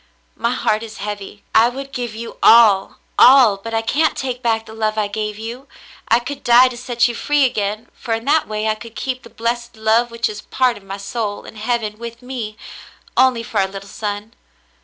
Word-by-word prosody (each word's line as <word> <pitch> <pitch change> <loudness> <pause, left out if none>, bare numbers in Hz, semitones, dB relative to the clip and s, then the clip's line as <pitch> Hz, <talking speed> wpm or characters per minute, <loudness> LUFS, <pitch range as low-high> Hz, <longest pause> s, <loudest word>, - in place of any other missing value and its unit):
My 235 - -1
heart 215 -3 0
is 225 -1 -9
heavy. 205 0 -6
I 225 +2 +6
would 275 +2 -7
give 240 -4 -4
you 230 +1 -7
all, 215 -4 +6 0.2
all, 250 -6 +7
but 225 +3 -6
I 225 - 0
can't 305 +7 +1
take 255 -2 -3
back 225 -2 0
the 220 - -11
love 215 -1 -1
I 210 -1 +1
gave 210 0 -4
you. 235 +5 -7 0.4
I 230 - +5
could 260 +4 -6
die 245 +2 +6
to 250 - -8
set 240 -1 +1
you 240 - -3
free 290 +3 +2
again, 215 -1 -2
for 225 - -3
in 225 +1 -6
that 300 +2 +2
way 215 0 -2
I 215 - +2
could 225 +1 -11
keep 255 -1 -3
the - - -14
blessed 235 0 -3
love 220 +2 +2
which 230 0 -1
is 210 0 -7
part 255 -2 +1
of 205 - -12
my 195 0 -6
soul, 205 +1 -4
in - - -11
heaven 220 -1 -2
with 235 +1 -8
me, 235 -4 -5 0.6
only 255 -3 +3
for 215 -2 -2
our 190 - +2
little 195 +1 -9
son. 205 +1 -5
230 Hz, 215 wpm, -19 LUFS, 215-245 Hz, 0.6 s, all